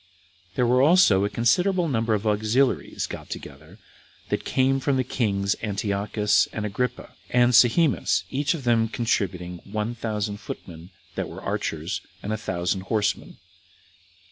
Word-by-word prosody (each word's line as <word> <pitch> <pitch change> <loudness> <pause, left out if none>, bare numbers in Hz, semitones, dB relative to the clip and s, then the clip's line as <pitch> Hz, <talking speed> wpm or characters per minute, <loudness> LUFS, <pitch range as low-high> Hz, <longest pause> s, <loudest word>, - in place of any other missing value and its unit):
There 125 - +2
were 125 +2 +3
also 140 - +5
a - - -1
considerable 175 - +2
number 115 -5 +1
of 105 +1 -4
auxiliaries 110 - +1
got - - -8
together, 80 +7 -9 0.5
that - - -1
came 135 +1 +2
from 135 0 0
the 130 - +1
kings 100 -5 0
Antiochus, 105 0 +1
and 110 - -4
Agrippa, 125 +5 -3 0.2
and 125 0 +3
Sohemus, 125 +6 +4
each 145 +4 0
of 150 - -7
them 115 -2 +3
contributing 90 -6 -2
one 105 +3 -3
thousand 105 -3 -3
footmen 85 -5 -9 0.2
that - - -3
were - - -9
archers, - - -3 0.2
and 105 - -2
a - - +1
thousand 90 -1 -2
horsemen. 105 -2 -1
110 Hz, 140 wpm, -25 LUFS, 100-125 Hz, 0.5 s, also